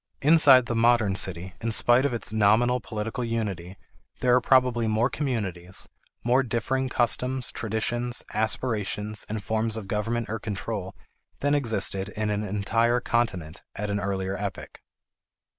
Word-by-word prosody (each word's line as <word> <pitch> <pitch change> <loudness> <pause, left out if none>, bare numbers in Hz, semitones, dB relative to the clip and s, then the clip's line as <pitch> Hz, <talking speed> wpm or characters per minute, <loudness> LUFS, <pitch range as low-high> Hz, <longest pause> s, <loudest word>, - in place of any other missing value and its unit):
Inside 145 -4 +7
the 120 - -3
modern 115 -3 +3
city, 95 0 -1
in 115 - -1
spite 120 +4 +4
of - - -5
its 115 -2 -4
nominal 110 +4 +3
political 115 +2 -4
unity, 100 -6 -4 0.4
there 125 -1 +3
are 125 - +5
probably 125 -3 +3
more 110 +4 +1
communities, 100 - -3 0.4
more 125 +3 +3
differing 130 +2 -1
customs, 125 +1 +1
traditions, 120 +3 -2
aspirations, 110 -2 -1
and 105 -1 -4
forms 110 +1 0
of 105 -3 -7
government 115 +3 -2
or 110 +1 -4
control, 100 -2 -5 0.5
than 145 +1 +1
existed 105 -7 0
in 105 0 -2
an 105 0 -1
entire 115 +4 +1
continent 100 -10 -2
at 105 0 -3
an 100 - -1
earlier 95 -1 -2
epoch. 100 -1 -6
110 Hz, 140 wpm, -26 LUFS, 100-120 Hz, 0.5 s, Inside